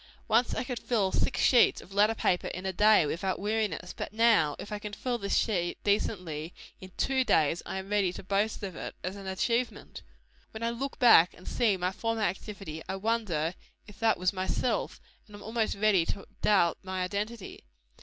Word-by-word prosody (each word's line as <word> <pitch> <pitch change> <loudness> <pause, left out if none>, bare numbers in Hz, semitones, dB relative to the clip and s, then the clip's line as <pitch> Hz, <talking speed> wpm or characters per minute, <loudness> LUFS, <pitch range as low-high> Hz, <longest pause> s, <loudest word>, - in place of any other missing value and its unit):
Once 230 +2 +2
I - - -1
could 250 -2 -4
fill 205 -6 0
six - - 0
sheets 245 -3 +5
of 195 - -13
letter 210 +3 +3
paper 180 -4 0
in 185 +1 -6
a 190 - -1
day, 210 -2 +5
without 180 +5 -2
weariness; 205 -4 -2
but - - -5
now, 220 -9 +3
if 210 - -9
I 210 - -3
can 210 0 -7
fill 245 +2 -2
this 200 -1 0
sheet, 175 -6 0
decently, 180 -6 -1 0.2
in 185 0 -11
two 265 -1 +1
days, 160 - +2
I - - -4
am 190 +1 -6
ready 200 -3 +2
to - - -8
boast 200 +3 -1
of 190 -3 -5
it, - - -6
as 185 +2 -4
an 195 -1 -9
achievement. 235 +6 -2 0.5
When 220 +1 -8
I 230 - 0
look 270 +4 -4
back 205 -8 +6
and 180 - -16
see 215 -5 +1
my 180 0 -1
former 225 +2 -2
activity, 195 -4 -4
I - - -2
wonder 195 -6 -1 0.3
if 210 - -15
that 225 -1 +3
was 185 +2 0
myself, 185 0 -1 0.3
and 210 - -13
am 205 - -11
almost 220 0 -1
ready 200 -3 +3
to 195 - -4 0.2
doubt 180 -5 +3
my 185 -1 -3
identity. 205 +3 -5
200 Hz, 195 wpm, -29 LUFS, 185-225 Hz, 0.5 s, back